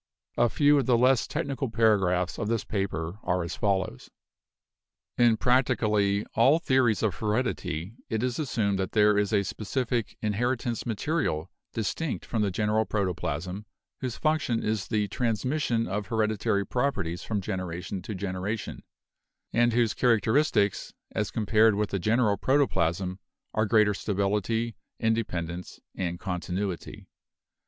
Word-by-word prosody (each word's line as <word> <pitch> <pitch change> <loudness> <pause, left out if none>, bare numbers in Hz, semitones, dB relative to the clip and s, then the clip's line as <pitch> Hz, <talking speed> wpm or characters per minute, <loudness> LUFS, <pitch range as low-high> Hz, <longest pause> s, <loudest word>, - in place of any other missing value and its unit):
A 120 0 +3
few 145 +2 +4
of 130 - -1
the 125 -2 +4
less 125 0 +3
technical 140 -4 -2
paragraphs 95 -6 +2
of - - -2
this 115 -1 0
paper 95 -2 -3
are 90 0 0
as 85 - -4
follows: 95 -9 -1 1.1
"In 120 -2 +4
practically 105 -5 +2
all 135 +7 +5
theories 130 -9 +2
of 105 -4 +2
heredity 105 -5 -2 0.2
it 110 +1 -1
is 125 +1 -1
assumed 110 -9 0
that 95 -1 -2
there 105 -1 +5
is 105 0 +1
a 100 -2 +3
specific 115 +3 -2
'inheritance 120 +3 -1
material,' 110 - -1 0.2
distinct 125 +7 -3
from 115 - -1
the 105 - +2
general 105 +3 +1
protoplasm, 95 -1 -3 0.3
whose 125 -3 -4
function 155 -7 0
is 105 -3 -1
the 105 -1 0
'transmission' 120 0 0
of 100 0 -3
hereditary 110 -2 0
properties 100 -11 -1
from 105 -2 -2
generation 90 0 -4
to 105 +3 -6
generation, 100 +3 -4 0.7
and 120 +1 +4
whose 115 -2 +2
characteristics, 115 -2 +2 0.2
as 105 -1 -1
compared 110 0 +3
with 105 0 -1
the 100 - -1
general 105 +2 +2
protoplasm, 95 - +1 0.3
are 110 0 +1
greater 105 -1 +4
stability, 105 +3 -1 0.2
independence 90 -7 -2
and 85 -1 -3
con 90 -2 -3
tinuity. 95 0 -4
105 Hz, 135 wpm, -27 LUFS, 95-120 Hz, 1.1 s, all